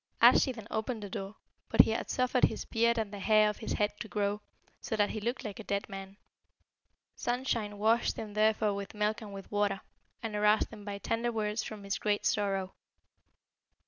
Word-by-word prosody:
"Arschi 265 - +7
then 225 -4 -9
opened 220 0 -2
the 200 - -7
door, 195 +2 -5 0.3
but - - +8
he - - +2
had 225 - -2
suffered 255 0 +3
his - - -3
beard 235 0 +2
and 215 -2 -2
the 205 - -5
hair 215 +1 +4
of 210 - -11
his 220 - -3
head 210 0 +1
to - - -5
grow, 205 0 -1 0.4
so - - -3
that 205 -1 +2
he 215 - -4
looked 240 +5 -2
like 210 -1 -5
a - - -6
dead 200 -1 -2
man. 195 0 -8 1.0
Sunshine 240 -4 -1
washed 225 +3 +2
him 210 -2 -6
therefore 215 0 +3
with 200 +1 -6
milk 210 +2 0
and 210 -2 -8
with 195 -1 -9
water, 205 -1 +1 0.4
and 220 -2 -3
aroused 210 +2 +3
him 210 -2 -10
by 200 -1 -5
tender 230 +3 -1
words 215 -1 -1
from 215 -2 -7
his 200 0 -2
great 205 -1 0
sorrow. 195 -2 0
210 Hz, 200 wpm, -31 LUFS, 205-225 Hz, 1.0 s, but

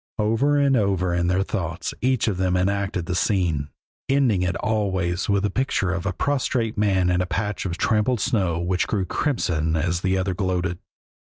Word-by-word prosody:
Over 115 +7 +2
and 140 -1 +3
over 95 -5 +1
in 85 0 +1
their 90 +2 +2
thoughts 85 -4 -3
each 130 -2 +1
of 100 -4 0
them 90 -1 +1
enacted 95 -1 -1
the 90 - -3
scene, 90 -7 0 0.4
ending 130 -9 +3
it 90 0 0
always 95 -5 -1
with 100 -1 +2
the 105 - 0
picture 110 -6 0
of 90 +1 -3
a - - +1
prostrate 125 +1 -1
man 95 -4 +2
in 90 0 +2
a 90 - -1
patch 105 +1 -2
of 85 -1 -4
trampled 110 +5 +1
snow 95 -9 0
which 90 +1 0
grew 100 -4 -1
crimson 85 - 0
as 85 +2 0
the 95 0 +1
other 95 0 -1
gloated. 90 -2 -1
95 Hz, 185 wpm, -23 LUFS, 90-110 Hz, 0.4 s, and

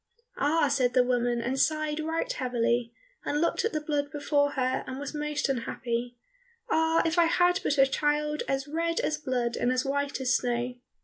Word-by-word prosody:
"Ah," 295 +1 +3
said 265 -3 +1
the 250 - +6
woman, 245 -1 0
and 260 +3 -2
sighed 310 0 +1
right 320 +1 -2
heavily, 240 -2 0 0.3
and 295 - -1
looked 335 - +1
at 445 - 0
the 310 - -1
blood 295 -1 -2
before 285 0 +1
her, 255 -1 0
and 260 +1 -5
was 285 +1 -5
most 300 -1 -1
unhappy, 240 -1 -3 0.5
"ah, 320 0 +3
if 330 +2 +1
I 340 - +6
had 355 +2 +3
but 290 - 0
a 270 - +7
child 300 +2 0
as 270 +1 -1
red 330 +2 -1
as 305 0 -1
blood 245 -4 -1
and 245 - +1
as 255 +1 0
white 285 +1 -1
as 255 -1 +2
snow!" 245 0 -1
285 Hz, 190 wpm, -28 LUFS, 250-305 Hz, 0.5 s, a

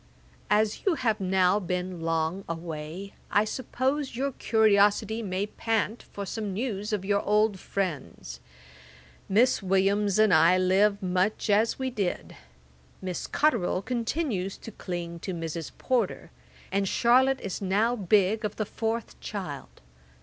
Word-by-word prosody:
'As 210 0 +2
you 380 -4 +2
have 225 -7 0
now 190 +1 +3
been 180 -2 -3
long 165 +3 -1
away, 165 +3 -6 0.2
I 205 - +3
suppose 260 +4 -2
your 275 +3 -1
curiosity 220 -1 +3
may 190 -1 -2
pant 220 +1 -1
for 200 - -5
some 210 0 -4
news 210 -2 -3
of 205 -3 -2
your 200 0 +2
old 210 -1 +2
friends. 180 -9 -4 0.9
Miss 225 +6 +3
Williams 195 +1 +2
and 215 -3 +5
I 165 +3 +6
live 195 +2 +3
much 185 +4 0
as 215 +3 +3
we 260 -1 -2
did. 200 -7 -3 0.6
Miss 185 -2 -4
Cotterel 245 -12 +1
still 185 - -1
continues 235 - -2
to 225 - -10
cling 175 -4 -5
to 185 +1 -4
Mrs. 165 -1 -5
Porter, 240 -6 -1 0.4
and 195 +1 +1
Charlotte 255 +5 +3
is 195 0 -5
now 205 +5 +1
big 205 +1 +2
of 210 -1 -2
the 215 - -2
fourth 225 +2 -3
child. 155 -10 -7
200 Hz, 140 wpm, -27 LUFS, 185-225 Hz, 0.9 s, I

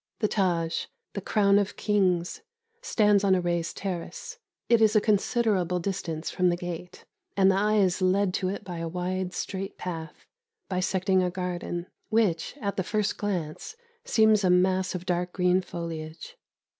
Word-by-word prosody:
The 215 - +1
Tâj 175 -5 0 0.3
the 200 - -4
Crown 200 0 +3
of 200 -1 -2
Kings 185 -5 +1 0.4
stands 210 - +3
on 195 -1 +4
a - - +2
raised 170 -1 -2
terrace; 185 -4 -5 0.3
it 235 -1 +4
is 220 0 +4
a - - +7
considerable 205 -4 +1
distance 170 -4 -3
from 180 0 +2
the 175 - +1
gate, 180 0 -7 0.3
and 195 0 +6
the - - +1
eye 210 +2 +2
is 190 -2 +2
led 185 +1 +2
to 185 -1 0
it 200 +2 -4
by 175 -3 -6
a 165 - -3
wide, 180 +2 -2
straight 195 0 -4
path, 165 -3 -6 0.4
bisecting 190 0 +1
a 180 - +1
garden, 175 -1 -4 0.2
which, 215 - +1
at 200 -2 -2
the 190 - +1
first 210 +2 0
glance, 190 - -3 0.3
seems 220 - +4
a 185 - +3
mass 185 +1 +2
of 180 0 -5
dark 180 -1 -1
green 180 0 +3
foliage. 165 - -7
185 Hz, 165 wpm, -27 LUFS, 175-200 Hz, 0.4 s, a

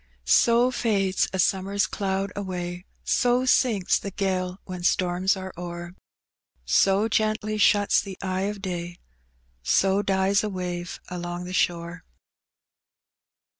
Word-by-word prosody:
So 235 - +4
fades 195 -6 +1
a 190 - -3
Bummer's 195 +2 +1
cloud 195 -1 -2
away, 180 -2 -5 0.2
So 250 +1 +2
sinks 225 -7 +3
the 200 - -5
£^le 185 -2 -2
when 180 -1 -7
storms 180 +2 +1
are 190 0 -7
o'er, 175 0 -7 0.7
So 195 - +3
gently 215 -1 0
shnts 205 0 +4
the 190 -2 -8
eye 190 +1 -1
of 205 -1 -7
day, 175 -2 -4 0.6
So 195 - +2
dies 195 +1 +2
a 215 - -1
wave 180 -2 -5
along 175 0 -5
the 180 - -7
shore. 170 -1 -1
190 Hz, 125 wpm, -25 LUFS, 180-200 Hz, 0.7 s, So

